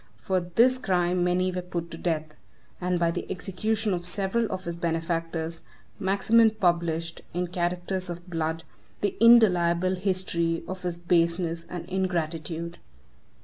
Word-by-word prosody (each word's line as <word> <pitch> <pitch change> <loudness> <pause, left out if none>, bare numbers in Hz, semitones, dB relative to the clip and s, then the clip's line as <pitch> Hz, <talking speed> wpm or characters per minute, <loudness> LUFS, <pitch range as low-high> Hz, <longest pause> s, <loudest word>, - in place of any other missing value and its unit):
For 185 - 0
this 230 +9 +3
crime 180 -4 +1
many 180 +1 +2
were 180 0 -3
put 175 -1 -5
to 165 - -6
death; 155 -3 -2 0.5
and 180 0 +1
by 170 -1 +2
the - - -5
execution 210 +3 -1
of 175 0 -2
several 200 +5 0
of 185 0 -4
his 170 0 -4
benefactors, 165 0 -2 0.4
Maximin 220 +4 +4
published, 170 -5 0
in 180 0 0
characters 180 +1 -2
of 175 +1 -7
blood, 165 -1 -2 0.4
the 205 - 0
indelible 185 -6 +6
history 180 -3 -1
of 185 0 -5
his 175 -1 -3
baseness 170 -1 +1
and 175 -2 -5
ingratitude. 170 -3 -2
175 Hz, 140 wpm, -27 LUFS, 170-185 Hz, 0.5 s, indelible